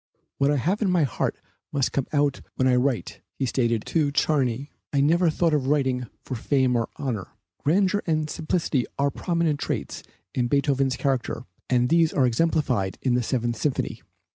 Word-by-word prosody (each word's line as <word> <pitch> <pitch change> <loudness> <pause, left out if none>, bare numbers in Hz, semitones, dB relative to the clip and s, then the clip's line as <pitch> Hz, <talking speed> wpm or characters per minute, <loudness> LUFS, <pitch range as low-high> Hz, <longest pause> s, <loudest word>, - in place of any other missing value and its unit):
"What 140 0 +3
I 145 - +3
have 180 - 0
in 205 - +2
my 180 -3 +3
heart 135 - -1 0.3
must 140 -2 0
come 140 - -1
out 145 -2 +1
when 130 - +2
I 125 - +4
write," 125 -1 -1 0.2
he 135 - 0
stated 115 -3 0
to 150 -4 +1
Czerny. 140 -2 +1 0.2
"I 140 - +1
never 165 +5 +4
thought 165 +1 +1
of 140 -3 +1
writing 130 -4 +1 0.2
for - - -6
fame 130 +1 +1
and 115 -1 +1
honor." 115 -8 -3 0.3
Grandeur 195 +6 +2
and 155 -2 +1
simplicity 155 -4 -1
are 140 0 +2
prominent 170 -3 0
traits - - -3 0.3
in 125 -1 +1
Beethoven's 135 -1 +1
character 130 -3 -1 0.3
and 125 -1 +3
these 165 -1 +4
are 135 - +3
exemplified 125 - +1
in 130 - +2
the 125 - +2
Seventh 120 -1 -1
Symphony. 140 +4 -2
140 Hz, 175 wpm, -25 LUFS, 125-155 Hz, 0.3 s, I